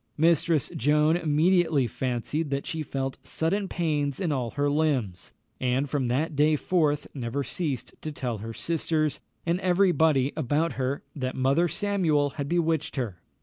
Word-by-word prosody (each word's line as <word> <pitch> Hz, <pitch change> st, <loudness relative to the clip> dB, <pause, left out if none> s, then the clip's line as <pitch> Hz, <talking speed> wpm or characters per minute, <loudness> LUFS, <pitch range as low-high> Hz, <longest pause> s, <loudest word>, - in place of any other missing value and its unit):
Mistress 160 Hz, -2 st, +3 dB
Joan 150 Hz, +4 st, +3 dB
immediately 160 Hz, -2 st, +3 dB
fancied 130 Hz, +6 st, -2 dB
that 140 Hz, 0 st, -2 dB
she 160 Hz, -, -3 dB
felt 135 Hz, -2 st, -3 dB
sudden 195 Hz, +5 st, -1 dB
pains 150 Hz, -6 st, -1 dB
in 175 Hz, -5 st, 0 dB
all 125 Hz, -4 st, -1 dB
her 145 Hz, +4 st, -1 dB
limbs, 145 Hz, -, 0 dB, 0.3 s
and 130 Hz, +2 st, +1 dB
from 135 Hz, -2 st, -1 dB
that 145 Hz, +6 st, 0 dB
day 150 Hz, +2 st, +4 dB
forth 150 Hz, -2 st, +1 dB
never 135 Hz, +1 st, -3 dB
ceased 145 Hz, -4 st, -3 dB
to 155 Hz, -, -4 dB
tell 125 Hz, -6 st, -3 dB
her 110 Hz, +2 st, -6 dB
sisters, 155 Hz, +2 st, 0 dB, 0.3 s
and 170 Hz, +2 st, +1 dB
every 185 Hz, 0 st, +3 dB
body 150 Hz, -5 st, +2 dB
about 150 Hz, +4 st, 0 dB
her, 130 Hz, +2 st, -2 dB
that 130 Hz, -3 st, -3 dB
Mother 135 Hz, +7 st, +2 dB
Samuel 170 Hz, -6 st, +1 dB
had 140 Hz, -1 st, -5 dB
bewitched 165 Hz, -3 st, 0 dB
her. 110 Hz, -, -3 dB
150 Hz, 155 wpm, -27 LUFS, 135-165 Hz, 0.3 s, day